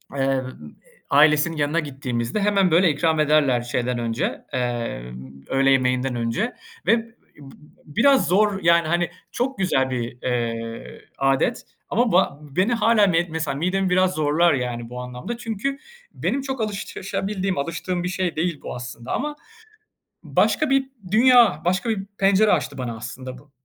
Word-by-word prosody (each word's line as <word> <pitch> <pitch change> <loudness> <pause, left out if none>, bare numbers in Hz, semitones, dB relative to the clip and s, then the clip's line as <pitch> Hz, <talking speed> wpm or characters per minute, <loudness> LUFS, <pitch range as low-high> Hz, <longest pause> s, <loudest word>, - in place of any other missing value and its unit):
emm, 135 - -1
ııı, 130 -1 -1 0.6
ailesinin 150 +3 +4
yanına 150 +3 +1
gittiğimizde 130 - -3
hemen 200 -3 +2
böyle 175 +2 +5
ikram 160 +1 +1
ederler 150 -5 +3
şeyden 125 +1 -2
önce, 115 0 -2
eee, 120 - -2 0.5
öğle 135 0 +2
yemeğinden 130 -1 +1
önce 120 - -1 0.3
ve 230 - +5
b - - -7
b 230 - -20 0.7
biraz 260 - +3
zor, 200 +1 +2
yani 170 -1 +4
hani 175 +1 +1 0.2
çok 265 +2 -2
güzel 135 -9 +1
bir, 120 -1 -4
eee, 115 -2 -3 0.2
âdet 135 - +1 0.3
ama 240 -1 +1
ba 175 -6 +2
beni 180 - 0
hâlâ 225 -2 +4 0.2
mesela 160 -3 -3
midemi 185 +5 0
biraz 185 0 +3
zorlar 155 +3 +3
yani 120 -3 -3
bu 125 +1 -6
anlamda 125 - -6
çünkü 240 +4 -3 0.4
benim 275 - -1
çok 265 -2 -4
alışabildiğim, 195 -2 -3
alıştığım 170 +4 -3
bir 180 - -2
şey 180 -1 -2
değil 165 -2 -2
bu - - -6
aslında 120 0 -7
ama 295 +2 -2 0.9
başka 310 -3 +1
bir 270 0 +3 0.2
dünya, 230 - +5
başka 185 +7 0
bir 210 -4 -1
pencere 200 +2 +4
açtı - - -1
bana 120 -3 -4
aslında 125 +2 -8
bu. 145 +3 -20
160 Hz, 150 wpm, -23 LUFS, 130-195 Hz, 0.9 s, böyle